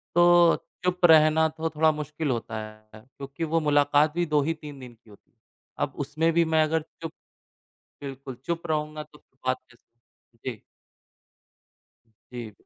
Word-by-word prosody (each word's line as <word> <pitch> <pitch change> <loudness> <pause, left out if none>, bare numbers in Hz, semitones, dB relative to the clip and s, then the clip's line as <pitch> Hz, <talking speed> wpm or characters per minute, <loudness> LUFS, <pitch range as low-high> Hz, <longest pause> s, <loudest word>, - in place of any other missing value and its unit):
तो 175 -1 +6 0.3
चुप 180 0 +2
रहना 160 0 +6
तो 160 +1 -3
थोड़ा 155 0 +3
मुश्किल 150 0 -4
होता 115 -2 -3
है 110 0 -16
क्योंकि 140 +5 -8
वो 165 +1 +1
मुलाकात 145 0 +3
भी 175 0 0
2 150 -2 +2
ही 165 +3 0
3 150 -3 -10
दिन 125 -2 -10
की 110 -1 -24
होती 100 - -19
है। - - -47 0.5
अब - - -14
उसमें 160 +3 +1
भी 170 0 +3
मैं 155 0 +5
अगर 160 +1 0 0.2
चुप, 165 -1 -5 0.9
बिल्कुल 135 -2 -7
चुप 170 0 -3
रहूँगा 150 0 -2
तो 150 - -19
फिर 135 - -35
बात 130 0 +2
कैसे 120 -1 -25
होगी? 120 +1 -10
जी। - - -25 1.7
जी। 120 -3 -7
150 Hz, 165 wpm, -26 LUFS, 130-160 Hz, 1.7 s, तो